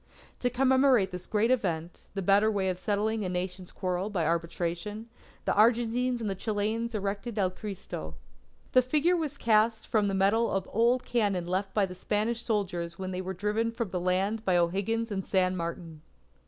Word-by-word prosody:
To 245 - +1
commemorate 260 -4 +3
this 180 0 -7
great 220 +3 +2
event, 175 -9 -1 0.2
the 195 - -2
better 200 +3 +5
way 195 -3 0
of 180 -1 -3
settling 210 +3 0
a 185 - -2
Nation's 180 0 -4
quarrel 185 +1 -2
by 180 -6 -1
Arbitration, 170 +6 -2 0.4
the - - +2
Argentines 240 +3 +3
and 195 -4 -3
Chileans 220 +2 -1
erected 205 +3 -3
El 190 -3 +2
Cristo. 185 - -7 0.6
The 255 - +6
figure 300 +7 +2
was 305 -4 -2
cast 220 -1 +2
from 215 -3 +1
the 195 - 0
metal 205 +4 +3
of 195 -1 -1
old 240 +3 +3
cannon 205 -7 0
left 190 +2 -2
by 205 -2 +4
the 180 - -8
Spanish 215 +5 -1
soldiers 180 -7 -2
when 190 0 -4
they 185 0 -3
were 190 +1 -5
driven 210 +4 0
from 230 -2 -3
the 180 0 -2
land 190 +5 0
by 185 -4 +3
O'Higgins 200 +6 0
and 195 -1 -2
San 185 -1 +1
Martin. 170 -2 -5
205 Hz, 180 wpm, -29 LUFS, 185-230 Hz, 0.6 s, The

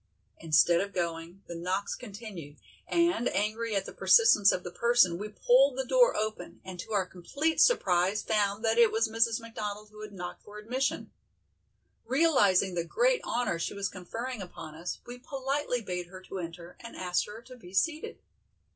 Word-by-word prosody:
Instead 165 +1 +4
of 200 0 -5
going, 170 +2 -4
the - - -8
knocks 185 +4 -2
continued, 200 -10 -9 0.3
and 340 -7 +2
angry 215 +2 -1
at 195 - 0
the - - -8
persistence 215 - +5
of 180 - -2
the 180 - -6
person, 235 -6 +3
we 210 +1 -5
pulled 255 +5 +3
the 265 - -1
door - - +4
open, 215 0 -4
and 185 -1 -8
to 195 - -7
our 200 -3 +1
complete 280 - -1
surprise 190 - +3
found 210 0 0
that 225 +1 +2
it 230 -2 +6
was 225 +1 +1
Mrs. 225 +1 +1
McDonald 210 -2 -6
who 215 0 -12
had 215 -1 -8
knocked 180 -3 -7
for 210 0 -12
admission. 250 +6 -2 0.9
Realizing 225 - +3
the 170 -1 -1
great - - +1
honor 235 -8 -1
she 170 - -3
was 200 -1 -2
conferring 225 +6 -6
upon 175 -4 -9
us, 165 +3 -5
we 245 +1 -9
politely 270 -1 -2
bade 180 -4 -4
her 185 +1 -12
to 190 - -7
enter 170 0 -8
and 235 - -10
asked 180 -1 -1
her 210 +2 -9
to 255 +2 -12
be 180 -8 -14
seated. 310 - -1
210 Hz, 180 wpm, -29 LUFS, 180-240 Hz, 0.9 s, it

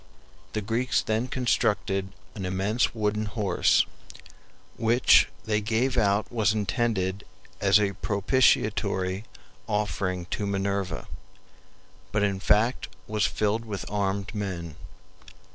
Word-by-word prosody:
The 110 - -1
Greeks 115 +5 0
then 110 +3 0
constructed 105 -6 0 0.2
an 100 - -6
immense 95 +7 0
WOODEN 105 0 0
HORSE, 100 -4 +2 0.9
which 115 +2 +5 0.2
they 105 -1 +1
gave 115 +5 0
out 105 -2 +1
was 110 -3 +2
intended 105 -3 -1 0.4
as 100 +1 +5
a 100 -1 0
propitiatory 100 -2 +1 0.4
offering 100 -4 -1
to 100 - -2
Minerva, 100 -3 -2 1.0
but 105 0 +1
in 100 -2 0
fact 110 +6 +2 0.2
was 105 -1 +1
filled 110 +2 0
with 105 -4 -5
armed 100 +1 -1
men. 90 -7 -4
105 Hz, 110 wpm, -26 LUFS, 100-110 Hz, 1.0 s, which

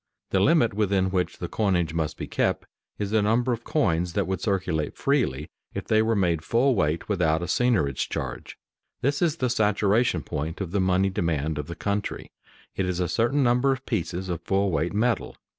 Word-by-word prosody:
The 95 - +3
limit 135 - +4
within 100 -2 +1
which 90 -2 -1
the 90 - -4
coinage 90 -6 0
must 80 -2 -2
be - - -4
kept - - -1 0.3
is 100 -1 -3
the 110 -1 +3
number 120 +4 +2
of 115 0 -5
coins 90 - 0
that - - 0
would 95 0 -3
circulate 90 -7 -1
freely 115 - 0 0.2
if - - -4
they 110 0 +3
were 110 +1 +1
made 85 -5 +1
full 125 +8 +2
weight 80 -6 0
without 85 -5 +1
a - - -1
seigniorage 95 - +1
charge. 65 -2 -5 0.4
This 140 +2 0
is 165 -3 +2
the 130 -6 0
"saturation 110 0 +2
point" 80 +4 -4
of 95 -4 -4
the 100 0 +1
money 95 +1 +2
demand 80 -4 -1
of 75 - -5
the 85 - -6
country; 100 +3 -3 0.4
it 95 - -1
is 90 -1 -2
a 90 - +1
certain 120 - +1
number 125 +2 +3
of 130 0 -3
pieces 95 -3 -2
of 85 -2 -3
full 95 +2 +1
weight 80 +3 0
metal. 115 +3 0
95 Hz, 195 wpm, -25 LUFS, 85-115 Hz, 0.4 s, limit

